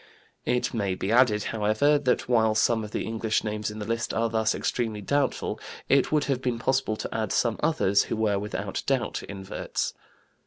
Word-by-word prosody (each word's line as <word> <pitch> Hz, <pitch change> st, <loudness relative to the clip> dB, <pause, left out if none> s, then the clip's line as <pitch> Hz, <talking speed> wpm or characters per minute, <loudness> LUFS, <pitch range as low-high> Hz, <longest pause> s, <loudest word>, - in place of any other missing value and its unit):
It 125 Hz, -, +1 dB
may 100 Hz, -5 st, -1 dB
be 95 Hz, +2 st, -2 dB
added, 115 Hz, -3 st, +4 dB
however, 110 Hz, +7 st, +2 dB
that 125 Hz, -2 st, 0 dB
while 110 Hz, -3 st, +3 dB
some 110 Hz, 0 st, +2 dB
of 105 Hz, -, -6 dB
the -, -, -3 dB
English 110 Hz, -1 st, -1 dB
names 105 Hz, 0 st, -2 dB
in 105 Hz, -, -7 dB
the 105 Hz, -, -5 dB
list 115 Hz, +1 st, -2 dB
are 115 Hz, 0 st, +1 dB
thus 110 Hz, -1 st, +1 dB
extremely 110 Hz, -4 st, -2 dB
doubtful, 140 Hz, +4 st, 0 dB, 0.3 s
it 135 Hz, -1 st, +4 dB
would 150 Hz, -1 st, +3 dB
have 135 Hz, -3 st, -1 dB
been 125 Hz, -2 st, -1 dB
possible 130 Hz, -1 st, 0 dB
to -, -, -6 dB
add 110 Hz, -3 st, -1 dB
some 115 Hz, -2 st, +1 dB
others 150 Hz, -11 st, +3 dB
who -, -, -2 dB
were 105 Hz, -2 st, +1 dB
without 105 Hz, +1 st, -4 dB
doubt -, -, 0 dB
inverts. 95 Hz, -1 st, -4 dB
110 Hz, 190 wpm, -26 LUFS, 105-125 Hz, 0.3 s, added